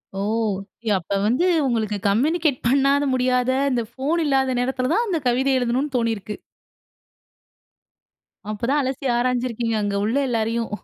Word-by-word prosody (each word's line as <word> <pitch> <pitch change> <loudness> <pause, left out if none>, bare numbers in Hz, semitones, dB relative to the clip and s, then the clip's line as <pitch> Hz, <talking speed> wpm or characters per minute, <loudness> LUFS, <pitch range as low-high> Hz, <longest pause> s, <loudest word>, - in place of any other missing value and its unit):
ஓ! - - -3 0.7
ய - - +2
அப்ப 175 +3 -6
வந்து, 250 +11 +2 0.2
உங்களுக்கு 220 -4 -1
கம்யூனிகேட் 290 - +1
பண்ணாத 275 +2 +3
முடியாத, 250 0 +1 0.2
இந்த 240 -2 0
ஃபோன் 295 +7 -1
இல்லாத 265 -2 +2
நேரத்தில 255 +1 -1
தான், 460 +6 +2
அந்த 350 -5 0
கவிதை 265 +3 +1
எழுதனும்னு 255 +4 -1
தோனியிருக்கு. 225 -3 -2 2.1
அப்போதான் 245 +7 0
அலசி 265 +1 -4
ஆராய்ஞ்சிருக்கீங்க, 240 -2 -1
அங்க 205 -1 -1
உள்ள 225 +4 -1
எல்லாரையும். 230 0 -1
250 Hz, 125 wpm, -22 LUFS, 230-275 Hz, 2.1 s, பண்ணாத